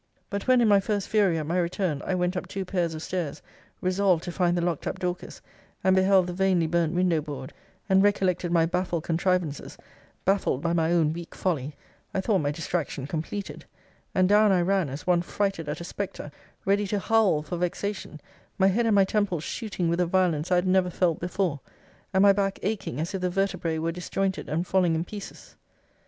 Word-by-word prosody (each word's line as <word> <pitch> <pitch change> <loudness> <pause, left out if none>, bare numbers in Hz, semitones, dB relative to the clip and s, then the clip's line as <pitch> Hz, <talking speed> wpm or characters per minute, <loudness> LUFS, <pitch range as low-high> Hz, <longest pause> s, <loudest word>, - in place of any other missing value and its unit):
But 200 +2 -3
when 255 -1 +5
in 230 - +4
my 200 -1 +6
first 200 0 -2
fury, 200 -6 +3
at 155 - -3
my 170 +4 0
return, 170 -4 -1
I 190 - -1
went 180 0 0
up 180 - -3
two 195 -1 -4
pairs 175 -3 -1
of 155 - -6
stairs, 175 -6 -3 0.4
resolved 185 -2 +2
to 175 - -4
find 175 -1 +1
the - - +1
locked 170 -4 -2
up - - -3
Dorcas, 180 0 -5 0.4
and 190 0 +4
beheld 190 -1 +4
the 180 - -4
vainly 185 -2 +2
burnt 170 0 0
window 175 -3 +2
board, 140 -3 -7 0.3
and 190 -1 +4
recollected 185 -3 +1
my 165 -1 +4
baffled 175 -1 -1
contrivances, 170 -3 -1 0.5
baffled 190 -8 +2
by 170 +3 -1
my 165 -1 +1
own 160 -3 +3
weak 170 0 -8
folly, 150 -6 -2 0.4
I 190 - +1
thought 195 -1 +2
my 145 - 0
distraction 150 -3 -3
completed; 165 +7 -5 0.5
and 185 -1 +4
down 210 +1 +5
I 185 -2 +3
ran 190 -4 +1
as 140 +3 -7
one 175 -2 +3
frighted 195 -3 -2
at 150 - -4
a - - -5
spectre, 180 -4 -5 0.3
ready 200 +1 +2
to 205 - -1
howl 200 -7 +2
for 165 +4 -4
vexation; 180 -1 -3 0.4
my 190 0 +4
head 230 +4 +1
and 220 - +3
my 195 -1 +5
temples 190 -6 0
shooting 200 -5 -3
with 170 +1 0
a 180 - +2
violence 175 -3 +1
I - - +5
had 180 +1 +2
never 185 -1 +3
felt 175 -2 +1
before; 180 -4 -1 0.5
and 190 0 +3
my 200 -1 +7
back 195 0 0
aching 195 - -2
as 165 +5 -3
if 190 - -3
the 180 - +1
vertebrae 180 -3 -1
were 165 +1 -1
disjointed, 190 +2 -2
and 165 +4 -1
falling 180 -3 +2
in 165 +2 -1
pieces. 205 +1 -10
180 Hz, 205 wpm, -26 LUFS, 165-195 Hz, 0.5 s, my